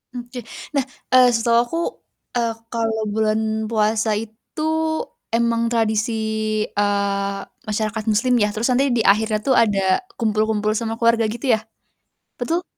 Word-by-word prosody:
Oke. 245 0 -7 0.3
Nah, 280 - +3 0.3
eee, 255 -1 +8
setahu 230 0 +3
aku, 245 +7 -5 0.6
eee, 235 -1 +1 0.2
kalau 225 -1 -1
bulan 220 0 +1 0.3
puasa 215 0 +1
itu 225 +8 -10 0.7
emang 230 0 +2
tradisi, 220 0 +1 0.6
eee, 200 -1 0 0.3
masyarakat 215 0 -2
muslim 230 +4 +2
ya, 210 -3 +2
terus 220 +4 -1
nanti 260 +2 +2
di 240 - +1
akhirnya 215 +2 +3
tuh 265 - +4
ada 210 -5 +3 0.4
kumpul-kumpul 215 -1 +1
sama 225 0 -3
keluarga 230 0 +3
gitu 240 +1 +1
ya? - - -4 0.8
Betul? 340 +2 0
225 Hz, 130 wpm, -21 LUFS, 215-235 Hz, 0.8 s, eee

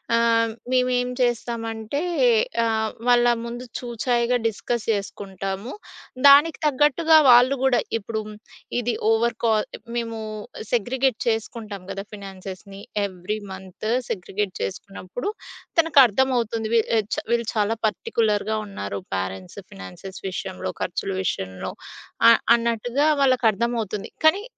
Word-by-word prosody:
ఆహ్, 230 -1 +3 0.2
మేము 255 0 +3
ఏం 245 0 -1
చేస్తామంటే, 235 +1 -1 0.6
ఆహ్, 220 -1 0 0.2
వాళ్ళ 245 -1 +5 0.2
ముందు 240 +1 -6
చూచాయిగా 240 0 0
డిస్కస్ 225 +1 -2
చేసుకుంటాము. 195 +1 -4 0.6
దానికి 290 +3 +7
తగ్గట్టుగా 300 +3 +4
వాళ్ళు 250 +3 +7
గూడా, 260 -2 +4 0.2
ఇప్పుడు 220 0 -4 0.6
ఇది 240 0 -1 0.2
ఓవర్ 230 +1 +2
కాల్ 220 -2 +2 0.3
మేము 230 -1 -3 0.5
సెగ్రిగేట్ 250 +2 +1
చేసుకుంటాం 220 -3 -3
గదా! 195 0 -5
ఫినాన్సెస్‌ని. 195 0 -9 0.2
Every 185 +2 -4
month 190 +2 -8 0.2
segregate 195 0 -3
జేసుకున్నప్పుడు, 195 - -5 0.5
తనకర్థమవుతుంది. 250 -6 +3
వీ 230 - +6 0.3
చా - - -4
వీళ్ళు 235 -1 +1
చాలా 215 +1 +1
పర్టిక్యులర్‌గా 215 0 0
ఉన్నారు. 100 - -5 0.2
పేరెంట్స్ 95 -1 -5
ఫైనాన్సెస్ 95 - -10
విషయంలో, 185 0 -4
ఖర్చుల 185 +2 -2
విషయంలో 95 - -3 0.6
అ - - +9 0.2
అన్నట్టుగా 235 +4 0
వాళ్ళకర్థమవుతుంది. 235 -5 +1
కానీ, 380 +6 +5
225 Hz, 105 wpm, -23 LUFS, 195-245 Hz, 0.6 s, అ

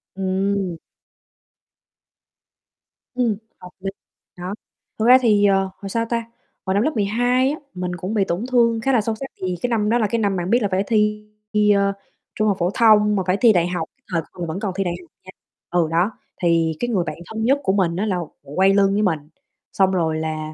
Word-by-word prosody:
Ừm. 190 -1 -1 2.4
Ừm, 235 -5 +1 0.2
hợp 180 - -11
lý, 195 +1 -3 0.5
nó, 180 +2 -5 0.5
thực 220 - +1
ra 255 +1 +9
thì, 210 -4 +4
ờ, 195 -1 +3
hồi, 195 - -7
sao 230 +3 -1
ta, 230 -1 -1 0.4
hồi 190 - 0
năm 205 - +2
lớp 310 - +1
12 245 +5 +2
á, 305 - -5
mình 180 -1 -4
cũng 185 +5 -4
bị 205 -3 +2
tổn 180 +8 -2
thương 230 -2 +3
khá 270 +2 +1
là 230 - +4
sâu 220 +1 -2
sắc, 270 - -6 0.2
thì 185 -1 -1
cái 245 - +1
năm 215 -3 +1
đó 235 - +3
là 220 -3 +1
cái 230 +3 -1
năm 200 -3 +1
bạn 175 +1 -3
biết 240 +2 +3
là 205 - +1
phải 190 +1 +1
thi 210 -1 +1 0.3
thi, 210 0 +4
ơ, 200 0 +2 0.4
trung 215 - +1
học 200 -3 +1
phổ 175 - +1
thông 210 -2 +5
mà 190 - 0
phải 185 +2 +2
thi 235 -3 +7
đại 175 -2 +2
học, 175 -3 -3
cái 265 - -45
thời 165 -2 +1
còn 175 -2 -6
vẫn 160 +4 -4
còn 200 -4 -3
thi 195 - 0
đại 175 -2 -2
học 170 - -22
nha, 185 - -12 0.4
ừ, 175 -2 +2
đó, 175 +6 +2 0.3
thì 165 -2 +2
cái 240 - -1
người 195 -7 +1
bạn 155 -2 -5
thân 220 +4 -5
nhất 275 +4 +3
của 190 - +1
mình 180 -4 +1
á, 200 - -1
là 195 -4 0 0.2
quay 185 +8 +2
lưng 195 -1 +3
với 210 - +1
mình, 170 -7 +1 0.5
xong 190 -1 +3
rồi 165 -4 0
là 155 -1 -4
200 Hz, 225 wpm, -21 LUFS, 180-220 Hz, 2.4 s, ra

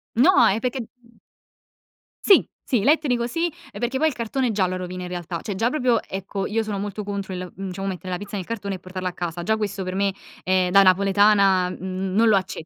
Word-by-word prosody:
No, 245 0 +6
è 210 +2 +2
perché 250 +2 -2 1.4
Sì, 395 - +6 0.2
sì, 245 -6 +1
elettrico 270 -2 +2
sì, 330 +7 -1 0.3
ehm, - - -9
perché 245 +2 -1
poi 315 +4 +3
il - - -6
cartone 245 +1 -1
già 195 -3 +1
lo 185 - -3
rovina 180 0 -5
in - - -5
realtà, 175 -1 -5
cioè 205 -4 -4
già 225 +5 +1
proprio 250 -5 +2
ecco 195 +1 -4
io 225 +2 0
sono 210 -2 -4
molto 205 +1 -4
contro 200 -1 -4
il, 180 -1 -6
mhmm, 195 +1 -5
diciamo 195 +1 -5
mettere 185 -1 -5
la 180 - -1
pizza 205 +2 -8
nel 190 -3 -4
cartone 200 -3 -4
e - - -9
portarla 185 0 -5
a - - -10
casa. 175 -1 -4
Già 220 +5 +1
questo 200 -2 -3
per 185 0 -4
me, 200 0 +1 0.3
ehm, 185 -1 +2
da 195 +1 +7
napoletana 195 0 +4
n 185 +1 -4
non 225 +3 +4
lo 215 - +5
acce 190 -4 -2
195 Hz, 230 wpm, -23 LUFS, 185-225 Hz, 1.4 s, da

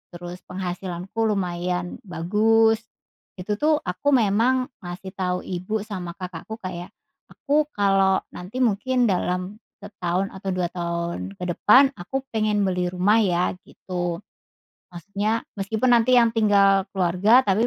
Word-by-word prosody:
terus 175 +1 -8
penghasilanku 180 +2 -5
lumayan 180 -3 -2
bagus. 220 +6 +3 0.6
Itu 205 +3 -4
tuh 310 +1 +3
aku 270 +11 +1
memang 245 +3 +2
ngasih 180 +1 -8
tahu 180 -1 -2
ibu 190 +4 -3
sama 185 -5 -6
kakakku 185 +3 -7
kayak, 185 +2 -7 0.3
"Aku 295 +1 0
kalau 195 -1 +3
nanti 210 +9 -4
mungkin 245 +3 +1
dalam 185 0 -1 0.2
setahun 190 -1 -2
atau 190 0 -6
2 180 -1 -1
tahun 170 - -4
ke - - -8
depan 265 +10 +5
aku 265 +10 -4
pengen 215 -2 +1
beli 180 -2 0
rumah 185 +5 +2
ya." 180 -4 +1 0.2
Gitu. 175 0 -4 0.7
Maksudnya 205 +5 -2 0.2
meskipun 220 +5 0
nanti 240 +1 +5
yang 235 -2 +5
tinggal 200 -3 +3
keluarga 190 +7 +4
tapi 215 +1 +2
195 Hz, 130 wpm, -23 LUFS, 180-220 Hz, 0.7 s, depan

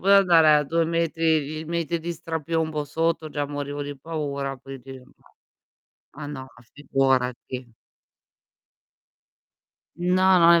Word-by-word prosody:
potuta 200 +1 +6
andare 170 -5 +6
a 150 0 +3
2 165 +3 +1
metri 165 -1 +1
di 155 +2 -5
metri 170 +1 -2
di 170 +2 -3
strapiombo 160 -2 -2
sotto, 160 +1 -1
già 145 -1 -2
morivo 145 0 -4
di 145 0 -6
paura, 140 -3 -4
quindi 135 0 -10
no. 130 +1 -19 1.0
Ah, 145 - -6
no, 145 -2 -6
ma 125 - -18
figurati. 130 -3 -1 2.2
No, 185 +1 +4
non 170 0 +7
è 170 - +6
155 Hz, 130 wpm, -25 LUFS, 140-165 Hz, 2.2 s, non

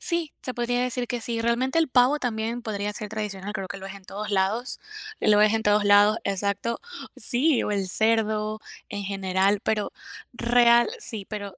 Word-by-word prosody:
sí, 335 -3 -1
se 255 - -5
podría 245 0 0
decir 250 0 -1
que 245 0 -3
sí, 230 0 -2
realmente 240 +6 +1
el 325 - +2
pavo 255 +3 +4
también 230 -1 -3
podría 205 -2 -3
ser 210 0 -5
tradicional, 205 -2 -5
creo 195 -3 -5
que 195 - -6
lo 190 - -8
es 195 - -8
en 195 -1 -13
todos 210 +3 -6
lados. 205 +6 0 0.4
Lo 210 -1 +4
ves 210 +1 +5
en 220 - 0
todos 210 0 +3
lados, 205 +2 +5
exacto 200 +3 -1 0.4
sí, 270 +2 +2
o - - -2
el 200 -2 -1
cerdo 215 0 +1 0.3
en 205 0 -5
general, 195 0 +1
pero 210 -2 -1 0.4
real, 240 0 +4
sí, 225 - -5
pero 205 -3 -6
215 Hz, 185 wpm, -25 LUFS, 200-240 Hz, 0.4 s, ves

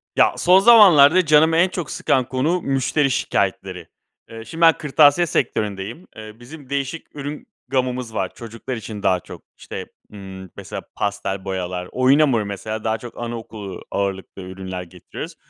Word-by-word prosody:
Ya, - - +4
son 180 +2 +5
zamanlarda 185 -7 +7
canımı 160 +2 +4
en 180 +2 +4
çok 175 -5 -5
sıkan 130 -2 +1
konu: 155 +7 0
müşteri 135 +1 0
şikâyetleri. 95 -6 -2 0.4
Eee, 115 0 -9
şimdi 165 +9 -8
ben 165 -1 +7
kırtasiye 150 +3 +4
sektöründeyim. 105 - -3
Eee, 110 0 -10
bizim 135 +2 -13
değişik 140 +3 -4
ürün 145 - -7 0.2
gamımız 125 -2 -2
var. 95 -3 -2
Çocuklar 115 +2 -7
için 110 -2 -8
daha 90 -1 +2
çok. - - -12 0.2
İşte, - - -7 0.3
ımm, 95 -2 -10
mesela - - -7
pastel 100 -1 -3
boyalar, 90 -1 -4
oyun 130 +3 +3
hamuru 125 -8 +2
mesela 110 +2 -5
daha 110 0 0
çok 120 +1 -11
anaokulu 110 -4 -7
ağırlıklı 95 -1 -3
ürünler 95 0 -7
getiriyoruz. 90 0 -10
120 Hz, 150 wpm, -21 LUFS, 100-145 Hz, 0.4 s, zamanlarda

